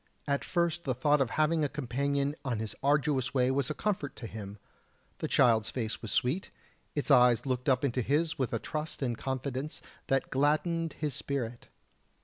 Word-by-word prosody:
At 140 Hz, -1 st, +1 dB
first 170 Hz, -1 st, 0 dB
the 130 Hz, -3 st, -1 dB
thought 145 Hz, +3 st, +3 dB
of 130 Hz, -, +2 dB
having 155 Hz, +4 st, +2 dB
a 145 Hz, -, +1 dB
companion 140 Hz, +2 st, -1 dB
on 125 Hz, -4 st, -1 dB
his 110 Hz, 0 st, -4 dB
arduous 140 Hz, -2 st, +1 dB
way 130 Hz, 0 st, +3 dB
was 135 Hz, -1 st, 0 dB
a 155 Hz, -, -2 dB
comfort 190 Hz, -9 st, -2 dB
to -, -, -8 dB
him. 105 Hz, -2 st, -7 dB, 0.6 s
The -, -, -1 dB
child's 115 Hz, -4 st, +4 dB
face 115 Hz, -3 st, -3 dB
was 115 Hz, -, -4 dB
sweet, 140 Hz, +10 st, 0 dB, 0.5 s
its 145 Hz, -, 0 dB
eyes 125 Hz, -1 st, +6 dB
looked 130 Hz, 0 st, 0 dB
up 130 Hz, +2 st, +3 dB
into 125 Hz, -1 st, 0 dB
his 150 Hz, +6 st, +1 dB
with 130 Hz, -, 0 dB
a 115 Hz, -, +1 dB
trust 155 Hz, +4 st, -4 dB
and 120 Hz, -3 st, 0 dB
confidence 130 Hz, +3 st, -3 dB, 0.3 s
that 135 Hz, 0 st, +1 dB
gladdened 155 Hz, +4 st, +1 dB
his 150 Hz, -3 st, -3 dB
spirit. 125 Hz, -3 st, -4 dB
135 Hz, 180 wpm, -30 LUFS, 125-150 Hz, 0.6 s, eyes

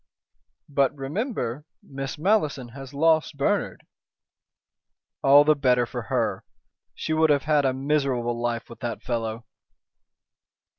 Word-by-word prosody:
"But 140 Hz, -2 st, +1 dB
remember 145 Hz, -, -3 dB, 0.2 s
Miss 135 Hz, 0 st, -6 dB
Malleson 150 Hz, -, +1 dB
has 135 Hz, +2 st, -10 dB
lost 160 Hz, +1 st, +2 dB
Bernard." 140 Hz, -, -1 dB, 1.4 s
"All 140 Hz, +2 st, +7 dB
the 155 Hz, +1 st, +5 dB
better 125 Hz, -4 st, +2 dB
for -, -, -5 dB
her. -, -, -1 dB, 0.5 s
She 160 Hz, -, -3 dB
would 160 Hz, 0 st, +3 dB
have 145 Hz, -2 st, +3 dB
had 150 Hz, -1 st, +2 dB
a 130 Hz, -, +2 dB
miserable 130 Hz, -4 st, -1 dB
life 120 Hz, -1 st, -2 dB
with 120 Hz, -, -12 dB
that 120 Hz, -2 st, -5 dB
fellow." 115 Hz, -1 st, -3 dB
135 Hz, 120 wpm, -25 LUFS, 120-150 Hz, 1.4 s, All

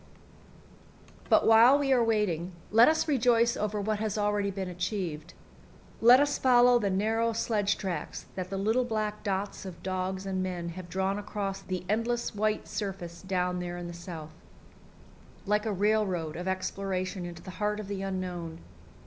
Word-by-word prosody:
But -, -, +5 dB
while 230 Hz, +5 st, +7 dB
we 275 Hz, -2 st, +2 dB
are 245 Hz, -2 st, +4 dB
waiting, 190 Hz, -6 st, 0 dB, 0.2 s
let 225 Hz, +3 st, +7 dB
us 320 Hz, +1 st, +2 dB
rejoice 235 Hz, -4 st, +3 dB
over 210 Hz, 0 st, -2 dB
what 210 Hz, +1 st, -1 dB
has 215 Hz, -1 st, -2 dB
already 205 Hz, -1 st, +1 dB
been 190 Hz, -1 st, -4 dB
achieved. 180 Hz, -3 st, -4 dB, 0.7 s
Let 240 Hz, +3 st, +8 dB
us 285 Hz, 0 st, +1 dB
follow 245 Hz, -1 st, +5 dB
the 205 Hz, -3 st, 0 dB
narrow 225 Hz, +4 st, +1 dB
sledge 215 Hz, -2 st, 0 dB
tracks 180 Hz, -6 st, -4 dB
that 185 Hz, -1 st, -5 dB
the 195 Hz, -, -3 dB
little 220 Hz, +6 st, +2 dB
black 215 Hz, -3 st, -2 dB
dots 200 Hz, -1 st, -2 dB
of 185 Hz, -3 st, -9 dB
dogs 185 Hz, +1 st, -2 dB
and 190 Hz, -1 st, -2 dB
men 180 Hz, -2 st, -3 dB
have 175 Hz, +1 st, -8 dB
drawn 190 Hz, +2 st, -1 dB
across 200 Hz, -1 st, -4 dB
the 185 Hz, -1 st, -4 dB
endless 235 Hz, +4 st, -1 dB
white 215 Hz, +1 st, -1 dB
surface 180 Hz, -5 st, -5 dB
down 180 Hz, -1 st, -1 dB
there 175 Hz, 0 st, -4 dB
in 175 Hz, -, -6 dB
the 170 Hz, -, -7 dB
South 170 Hz, -3 st, -8 dB, 1.1 s
like 210 Hz, +2 st, +1 dB
a -, -, 0 dB
railroad 195 Hz, -5 st, 0 dB
of 180 Hz, +2 st, -5 dB
exploration 190 Hz, 0 st, -2 dB
into 175 Hz, -1 st, -8 dB
the 185 Hz, -, -8 dB
heart 210 Hz, 0 st, 0 dB
of 210 Hz, -, -6 dB
the 200 Hz, -1 st, -4 dB
unknown. 180 Hz, -4 st, -4 dB
195 Hz, 165 wpm, -29 LUFS, 185-220 Hz, 1.1 s, Let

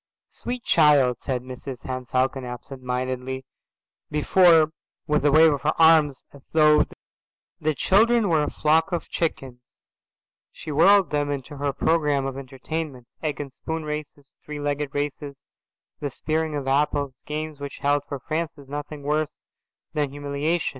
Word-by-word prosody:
"Sweet 245 Hz, 0 st, -6 dB
child," 140 Hz, -6 st, +4 dB
said 125 Hz, -3 st, -3 dB
Mrs 130 Hz, 0 st, -8 dB
Henne 130 Hz, -1 st, -5 dB
Falcon 130 Hz, +1 st, 0 dB
absent 125 Hz, +2 st, -8 dB
mindedly, 130 Hz, +1 st, -3 dB, 0.6 s
before, 160 Hz, +1 st, +5 dB, 0.3 s
with 150 Hz, 0 st, +1 dB
a 145 Hz, -, +4 dB
wave 160 Hz, +1 st, +6 dB
of 140 Hz, -, -3 dB
her 150 Hz, +2 st, 0 dB
arms, 160 Hz, -4 st, +5 dB
as 140 Hz, -1 st, -16 dB
though 150 Hz, -1 st, +5 dB, 0.7 s
the 155 Hz, -1 st, 0 dB
children 225 Hz, -, +3 dB
were 160 Hz, -4 st, +3 dB
a 150 Hz, -, 0 dB
flock 160 Hz, +4 st, +2 dB
of 175 Hz, -, -2 dB
chickens, 130 Hz, -7 st, -4 dB, 0.7 s
she 155 Hz, -, -8 dB
whirled 185 Hz, +3 st, +5 dB
them 145 Hz, -1 st, 0 dB
into 140 Hz, 0 st, -5 dB
her 145 Hz, +1 st, -2 dB
set 140 Hz, -, -2 dB
programme 150 Hz, -4 st, +2 dB
of 135 Hz, -1 st, -3 dB
entertainments: 135 Hz, -1 st, -6 dB
egg 150 Hz, -3 st, -2 dB
and 140 Hz, -3 st, -6 dB
spoon 160 Hz, +3 st, -5 dB
races, 150 Hz, -2 st, -7 dB
three 150 Hz, -1 st, -7 dB
legged 145 Hz, 0 st, -2 dB
races, 145 Hz, -1 st, -5 dB, 0.5 s
the 145 Hz, -, -3 dB
spearing 155 Hz, +3 st, -2 dB
of 140 Hz, -2 st, -4 dB
apples, 140 Hz, -1 st, 0 dB
games 155 Hz, 0 st, -4 dB
which 140 Hz, -1 st, -7 dB
held 145 Hz, 0 st, +1 dB
for 145 Hz, -1 st, -5 dB
Francis 155 Hz, 0 st, -4 dB
nothing 145 Hz, +1 st, -6 dB
worse 150 Hz, +1 st, -2 dB, 0.4 s
than 150 Hz, -2 st, 0 dB
humiliation. 145 Hz, +4 st, -1 dB
145 Hz, 155 wpm, -24 LUFS, 135-155 Hz, 0.7 s, wave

